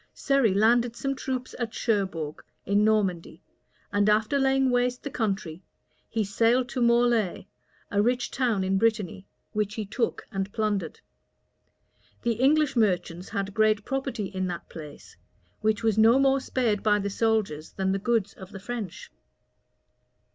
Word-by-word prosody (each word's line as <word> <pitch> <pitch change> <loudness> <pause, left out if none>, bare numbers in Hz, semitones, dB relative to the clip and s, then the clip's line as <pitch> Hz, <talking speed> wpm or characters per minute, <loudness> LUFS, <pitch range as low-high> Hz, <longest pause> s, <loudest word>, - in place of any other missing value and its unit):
Surrey 275 -6 +2
landed 235 +3 +3
some 275 +2 -2
troops 255 -1 -4
at 230 -2 -3
Cherbourg, 190 -9 -2 0.2
in 200 +2 +2
Normandy; 200 -6 0 0.5
and 205 +1 +3
after 215 +6 +2
laying 270 -1 +2
waste 245 0 0
the 285 - -5
country, 195 -8 -2 0.5
he 220 -1 0
sailed 230 +5 +2
to 250 - -3
Morlaix, 235 -6 +2 0.5
a 205 - +2
rich 245 +3 0
town 235 -7 0
in 190 +1 +1
Brittany, 210 -4 0 0.2
which 210 -1 -2
he 215 - -3
took 225 +3 -2
and 195 +1 -3
plundered. 205 -7 -2 1.2
The 235 - +2
English 275 +4 +2
merchants 180 -5 0
had 200 0 -3
great 215 0 +2
property 270 -5 -2
in 190 -1 -3
that 175 -1 -6
place, 150 -3 -11 0.4
which 220 +1 0
was 220 -1 +2
no 225 +3 +6
more 270 0 +3
spared 235 -6 0
by 210 -1 +3
the 200 0 -2
soldiers 205 -9 -1
than 190 0 -1
the 195 - 0
goods 215 -2 0
of 190 0 -12
the 195 - -8
French. 210 -3 -6
215 Hz, 150 wpm, -26 LUFS, 195-240 Hz, 1.2 s, no